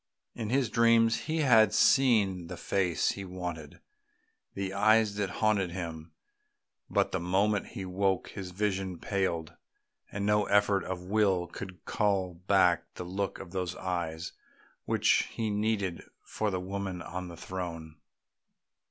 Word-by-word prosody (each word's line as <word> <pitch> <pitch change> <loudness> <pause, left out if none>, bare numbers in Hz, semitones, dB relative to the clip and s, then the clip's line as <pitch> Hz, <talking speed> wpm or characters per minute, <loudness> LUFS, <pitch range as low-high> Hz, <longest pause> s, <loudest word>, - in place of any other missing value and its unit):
In 110 -3 -4
his 130 -2 +1
dreams 115 -1 +4
he 160 0 +1
had 110 -6 +5
seen 105 -10 +4
the - - -7
face 90 -4 0
he 100 - -3
wanted, 90 -5 -6 0.8
the 95 -1 -3
eyes 110 +1 +4
that 100 -2 -1
haunted 100 -1 +1
him; 85 -2 -6 0.8
but - - +1
the 95 - -1
moment 95 +4 +1
he 95 - -4
woke 95 0 0
his 95 -3 -7
vision 95 -1 -2
paled, 85 -5 -2 0.6
and 100 0 -3
no 105 0 +3
effort 100 -1 +3
of 90 -1 -4
will 95 -2 +2
could 95 +1 -9
call 100 -4 0
back 90 -1 +2
the 90 - -6
look 95 +2 -3
of 90 - -10
those 90 -1 -3
eyes 85 -3 -3 0.5
which - - +2
he 110 -2 -1
needed 105 -4 -1 0.2
for 110 - -2
the 95 -2 -2
woman 95 -1 -4
on 90 0 -6
the 85 -1 -10
throne. 85 -4 -6
95 Hz, 145 wpm, -30 LUFS, 90-105 Hz, 0.8 s, had